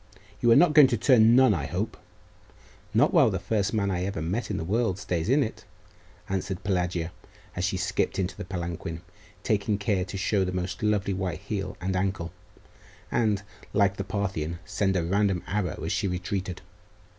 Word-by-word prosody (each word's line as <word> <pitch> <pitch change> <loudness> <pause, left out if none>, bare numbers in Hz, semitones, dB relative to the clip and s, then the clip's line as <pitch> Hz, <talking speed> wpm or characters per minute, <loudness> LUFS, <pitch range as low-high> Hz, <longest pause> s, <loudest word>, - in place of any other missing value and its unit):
'You 120 - +3
are - - +8
not 175 +1 +6
going 150 -3 +9
to 120 - 0
turn 115 -1 +5
nun, 130 0 +6
I 75 -4 -2
hope?' - - -3 1.0
'Not - - +3
while - - +6
the - - -1
first 100 -2 0
man 100 -3 0
I 90 -1 -1
ever 95 -2 -3
met 95 +9 -2
in 105 - -2
the - - -3
world 105 +1 0
stays 90 -2 -2
in 140 +3 +4
it,' 110 - -6 0.6
answered 95 0 -3
Pelagia, 90 -3 -1 0.4
as 90 - -1
she 95 -1 -1
skipped 95 0 -1
into 95 0 -1
the 100 - -6
palanquin, 85 -2 -5 0.4
taking 105 0 +1
care 100 -2 0
to 95 +1 -6
show 100 0 +1
the 90 - -2
most 90 0 -3
lovely 105 -2 +1
white 90 -3 -3
heel - - -4
and 95 +2 -2
ankle, 95 -2 -1 0.8
and, 105 -4 +1 0.3
like 100 -1 +3
the 100 - -2
Parthian, 95 -5 -2
send 100 -1 0
a 90 - +1
random 95 +1 +1
arrow 95 -5 -2
as - - -2
she - - 0
retreated. 90 0 -3
95 Hz, 185 wpm, -27 LUFS, 90-105 Hz, 1.0 s, going